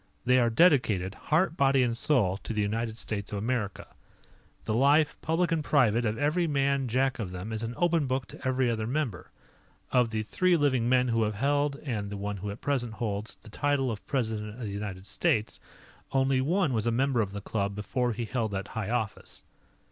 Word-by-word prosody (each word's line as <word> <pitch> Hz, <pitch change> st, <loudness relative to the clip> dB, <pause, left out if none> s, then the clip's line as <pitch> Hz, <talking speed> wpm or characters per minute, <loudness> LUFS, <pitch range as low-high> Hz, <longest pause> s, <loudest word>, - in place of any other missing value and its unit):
They 125 Hz, +1 st, +5 dB
are 120 Hz, -1 st, +3 dB
dedicated, 115 Hz, -, +3 dB
heart, 160 Hz, -, +1 dB
body, 135 Hz, -3 st, +3 dB
and 120 Hz, -2 st, 0 dB
soul 115 Hz, -8 st, +2 dB
to 115 Hz, -, -6 dB
the 105 Hz, -, 0 dB
United 110 Hz, +2 st, -2 dB
States 100 Hz, -3 st, -4 dB
of 105 Hz, -, -3 dB
America. 110 Hz, -1 st, -2 dB, 0.8 s
The 110 Hz, -, -1 dB
life, 145 Hz, +6 st, +4 dB
public 165 Hz, +2 st, 0 dB
and 160 Hz, -2 st, +1 dB
private, 120 Hz, -6 st, +3 dB
of 110 Hz, 0 st, -1 dB
every 155 Hz, +4 st, +1 dB
man 140 Hz, -2 st, +1 dB
Jack 130 Hz, +3 st, +1 dB
of 105 Hz, -5 st, -3 dB
them 90 Hz, +5 st, -6 dB
is 110 Hz, -, -3 dB
an 115 Hz, +1 st, -4 dB
open 170 Hz, -4 st, +2 dB
book 130 Hz, 0 st, -1 dB
to -, -, -11 dB
every 130 Hz, -1 st, +1 dB
other 110 Hz, -2 st, -1 dB
member. 125 Hz, -, -2 dB, 0.6 s
Of 125 Hz, -2 st, +3 dB
the 110 Hz, -1 st, -2 dB
three 180 Hz, -, +2 dB
living 130 Hz, -6 st, +2 dB
men 125 Hz, 0 st, +3 dB
who 115 Hz, -1 st, +1 dB
have 105 Hz, -1 st, 0 dB
held 145 Hz, +4 st, +1 dB
and 110 Hz, -8 st, -3 dB
the 100 Hz, -, -5 dB
one 100 Hz, +1 st, -3 dB
who 100 Hz, +2 st, -5 dB
at 100 Hz, -, -7 dB
present 125 Hz, -5 st, -1 dB
holds 105 Hz, -1 st, -4 dB
the 110 Hz, -, -16 dB
title 140 Hz, 0 st, +1 dB
of 105 Hz, -, -6 dB
President 110 Hz, -5 st, -2 dB
of -, -, -8 dB
the 105 Hz, -4 st, -4 dB
United 100 Hz, -2 st, -5 dB
States, 115 Hz, -5 st, 0 dB, 0.5 s
only 135 Hz, -1 st, +2 dB
one 165 Hz, +1 st, +1 dB
was 110 Hz, 0 st, 0 dB
a -, -, +3 dB
member 130 Hz, 0 st, +2 dB
of 100 Hz, -3 st, -2 dB
the 100 Hz, -, -5 dB
club 100 Hz, 0 st, -2 dB
before 120 Hz, +4 st, -1 dB
he 115 Hz, +2 st, -3 dB
held 115 Hz, -1 st, -1 dB
that 95 Hz, +2 st, -4 dB
high 110 Hz, -3 st, -4 dB
office. 115 Hz, -4 st, -3 dB
120 Hz, 210 wpm, -28 LUFS, 105-140 Hz, 0.8 s, They